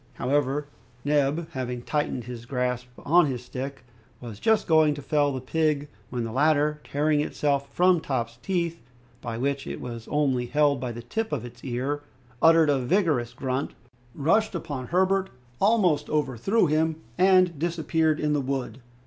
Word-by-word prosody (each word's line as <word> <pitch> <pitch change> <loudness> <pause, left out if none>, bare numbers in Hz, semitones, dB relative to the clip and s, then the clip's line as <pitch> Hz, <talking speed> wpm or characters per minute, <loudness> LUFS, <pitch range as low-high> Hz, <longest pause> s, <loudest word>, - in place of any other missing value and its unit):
However, 140 +2 0 0.4
Neb 145 +2 +1
having 125 -4 -4
tightened 145 -4 -1
his 120 0 -8
grasp 125 -1 -1 0.2
on 170 +2 +5
his 125 -2 -4
stick, 135 +2 -6 0.4
was 115 -4 -9
just 220 -1 +2
going 155 -2 +4
to 145 - -7
fell 145 -1 +2
the 130 - -3
pig, 150 +2 0 0.2
when 125 -1 -3
the 115 - -4
latter, 150 +3 +2
tearing 150 +1 +1
itself 140 -2 -1
from 180 0 +3
Top's 120 -6 -3
teeth, 170 -3 -2 0.4
by 115 -1 -4
which 140 +2 -2
it - - -5
was 115 -2 -7
only 135 -5 +1
held 145 0 +2
by 125 -1 -3
the 120 0 -8
tip 220 - -3
of 130 -6 -2
its 120 - -12
ear, 135 +3 -2 0.4
uttered 165 -2 +6
a 140 - +2
vigorous 130 - +1
grunt, 130 +1 -3 0.4
rushed 205 +8 +2
upon 145 -7 -4
Herbert, 190 +1 +2 0.3
almost 195 -8 +3
overthrew 150 - +1
him, 160 +1 +1 0.2
and 185 -3 +4
disappeared 160 -1 +1
in 150 0 +1
the 145 - +1
wood. 130 -2 -3
145 Hz, 160 wpm, -26 LUFS, 125-160 Hz, 0.4 s, uttered